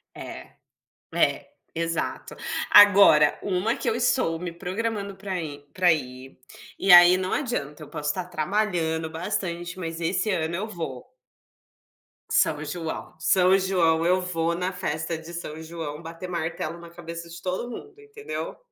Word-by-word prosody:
É. - - -9 0.6
É, - - +1 0.2
exato. 165 0 -3 0.4
Agora, 200 -8 +7
uma 200 +5 0
que - - -3
eu 455 - +1
estou 165 - +1
me 175 +1 -4
programando 200 +4 -3
para 190 -1 -4
ir 145 -3 -6
para 180 -2 +4
ir, 130 -3 -6 0.4
e 195 - +1
aí 175 +1 +10
não 185 0 -3
adianta, 155 - -3
eu 150 - -10
posso 150 - -4
estar 180 +5 -1
trabalhando 170 -2 -1
bastante, 175 0 -3
mas 165 -2 -5
esse 180 +6 0
ano 170 -3 -1
eu 200 +5 -3
vou. 160 - -7 1.2
São 145 - +2
João. 160 +1 -5
São 185 +3 +4
João, 170 -4 +2
eu 180 +2 +3
vou 170 -2 -1
na 180 +2 -2
festa 160 -2 -3
de 160 +2 -10
São 160 -2 -6
João 160 -2 -6
bater 165 +2 -8
martelo 170 -1 -3
na 170 0 -12
cabeça 170 0 -8
de 170 0 -10
todo 185 +6 -3
mundo, 420 - -10
entendeu. 430 0 -7
170 Hz, 150 wpm, -25 LUFS, 160-190 Hz, 1.2 s, aí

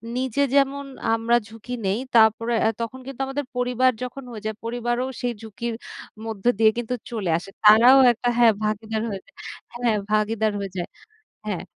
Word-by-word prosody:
নিজে 260 +1 -1
যেমন 280 0 +2 0.3
আমরা 225 +1 +2
ঝুঁকি 225 +2 -9
নেই, 195 +3 0 0.2
তারপরে 225 +1 +4
আ - - +4
তখন 230 +3 -5
কিন্তু 270 -1 -6
আমাদের 280 +1 -3
পরিবার 250 +1 +2
যখন 250 +2 -6
হয়ে 220 -3 -8
যায়, 220 0 -2
পরিবারও 240 +1 -1 0.2
সেই 245 -1 -1
ঝুঁকির 225 +2 -5 0.5
মধ্য 220 -3 -6
দিয়ে 220 0 +5
কিন্তু 240 0 -3 0.2
চলে 210 -6 -3
আসে। 180 - -9
তারাও 230 +5 +8
একটা 240 +1 -3
হ্যাঁ, 235 -2 +6
ভাগীদার 215 +1 -2
হয়ে 195 -2 -5
যায়, - - -24 0.4
হ্যাঁ, 240 -2 +1 0.2
ভাগীদার 215 0 +1
হয়ে 195 -1 -5
যায়। 175 - -3 0.6
হ্যাঁ। 200 -5 -3
230 Hz, 170 wpm, -23 LUFS, 215-245 Hz, 0.6 s, তারাও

